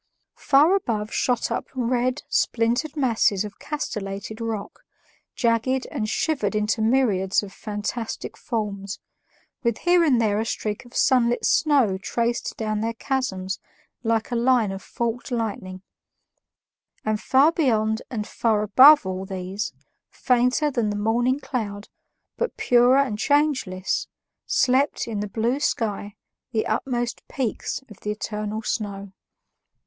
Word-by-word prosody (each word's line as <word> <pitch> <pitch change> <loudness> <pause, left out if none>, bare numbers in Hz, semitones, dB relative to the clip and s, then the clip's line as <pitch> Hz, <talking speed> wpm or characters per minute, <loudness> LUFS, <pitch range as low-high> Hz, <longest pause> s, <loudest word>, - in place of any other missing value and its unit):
Far 295 +7 +5
above 220 - -2
shot 245 -2 0
up - - -2
red, 250 +2 0
splintered 240 +7 0
masses 225 -7 +2
of 205 -1 -10
castellated 210 -6 -5
rock, 225 -3 -4 0.6
jagged 240 +2 +1
and 220 -7 -2
shivered 225 -10 0
into 210 +1 0
myriads 215 -6 +2
of 195 -1 -9
fantastic 210 +2 -5
forms, 200 -4 -4 0.6
with 235 -3 0
here 350 0 +5
and 270 -7 +3
there 210 -2 +2
a 220 - -1
streak 210 0 -3
of 240 - -16
sunlit 245 -2 +3
snow 265 -11 +3
traced 235 +4 -2
down 215 -1 -1
their 230 +1 -2
chasms 195 -8 -2 0.4
like 225 0 0
a - - 0
line 235 -3 +3
of 195 0 -6
forked 235 +3 -3
lightning; 200 -6 -4 1.2
and 215 -1 0
far 275 +4 +4
beyond 220 -9 +1
and 215 -5 -3
far 215 -2 0
above 265 +6 +8
all 185 0 -3
these, 190 +1 -4 0.4
fainter 250 +4 +1
than 235 -5 0
the 205 - -2
morning 240 +6 +1
cloud 220 -7 -4 0.5
but 480 - -2
purer 245 +2 +5
and 255 -7 +1
changeless, 280 -12 +1 0.4
slept, 270 +1 +2
in 220 -3 -3
the 205 0 -3
blue 235 +6 0
sky, 205 -6 -2 0.4
the 220 - +1
utmost 240 -2 -2
peaks 260 0 -3
of 210 - -14
the 210 - -5
eternal 210 +1 -3
snow. 200 -3 -4
230 Hz, 135 wpm, -24 LUFS, 210-255 Hz, 1.2 s, above